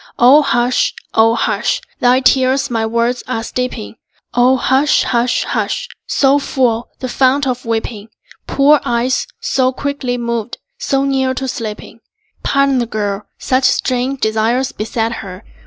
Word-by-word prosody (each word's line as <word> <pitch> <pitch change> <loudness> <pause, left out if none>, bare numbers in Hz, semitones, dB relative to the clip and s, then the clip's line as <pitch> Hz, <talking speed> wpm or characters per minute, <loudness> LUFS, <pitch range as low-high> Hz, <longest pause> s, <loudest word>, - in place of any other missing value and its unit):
O 260 +5 +7
hush, 245 -2 +1 0.2
O 225 +1 +4
hush! 230 +1 0 0.2
Thy 250 +1 +3
tears 260 0 +2
my 225 -1 0
words 235 +2 0
are 225 -3 -2
steeping. 230 - -4 0.4
O 250 +2 +4
hush, 265 +3 +2
hush, 240 0 +1
hush! - - -2 0.2
So 275 +1 +3
full, 240 -4 0
the 255 - -5
fount 265 +2 +2
of 250 -2 -3
weeping? 225 -2 -3 0.4
Poor 285 +2 +4
eyes, 240 +2 0
so 255 -1 +1
quickly 265 -2 -3
moved, 235 0 -3 0.2
so 275 - 0
near 265 -1 0
to 265 +1 -3
sleeping? 220 -2 -6 0.4
Pardon 275 -1 +2
the 240 - -1
girl; 205 -2 -3
such 255 0 0
strange 255 +1 0
desires 225 +4 +1
beset 225 +1 -2
her. 185 -3 -9
250 Hz, 140 wpm, -16 LUFS, 230-265 Hz, 0.4 s, O